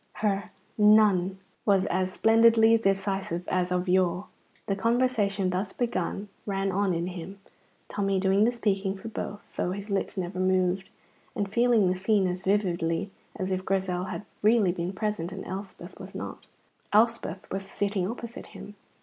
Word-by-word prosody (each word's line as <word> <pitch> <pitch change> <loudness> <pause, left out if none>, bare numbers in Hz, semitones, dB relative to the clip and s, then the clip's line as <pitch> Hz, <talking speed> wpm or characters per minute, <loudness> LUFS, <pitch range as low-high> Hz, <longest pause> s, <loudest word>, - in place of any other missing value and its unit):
Her 200 -1 -1 0.3
"None!" 210 -3 +5 0.3
was 195 -3 +3
as 185 +1 0
splendidly 225 +2 +5
decisive 195 -4 0
as 180 -1 0
of 180 +1 0
yore. 180 +1 +2 0.4
The 195 - 0
conversation 210 -4 +1
thus 190 +2 -2
begun 205 -4 -2 0.2
ran 195 -1 0
on 190 -1 +1
in 170 +1 -1
him, 180 +1 -7 0.5
Tommy 195 -2 0
doing 195 +2 +3
the 235 - +4
speaking 200 -4 0
for 210 +4 -8
both 205 -1 -7
(though 180 - 0
his 200 +2 -6
lips 195 0 -1
never 185 0 -3
moved), 185 0 +1 0.5
and 205 - -1
feeling 235 -1 +3
the 180 - +1
scene 195 +1 +2
as 180 0 -2
vividly 185 -2 0 0.2
as 190 -2 -3
if 185 0 -1
Grizel 185 -2 -1
had 195 +2 -6 0.2
really 215 -3 +4
been 175 0 -3
present 195 -3 -3
and 195 0 -7
Elspeth 195 +2 -8
was - - -10
not. - - -7 0.4
Elspeth 215 -4 +2
was 195 0 -3
sitting 200 -2 -1
opposite 235 0 -7
him. 205 - -9
195 Hz, 160 wpm, -27 LUFS, 185-210 Hz, 0.5 s, None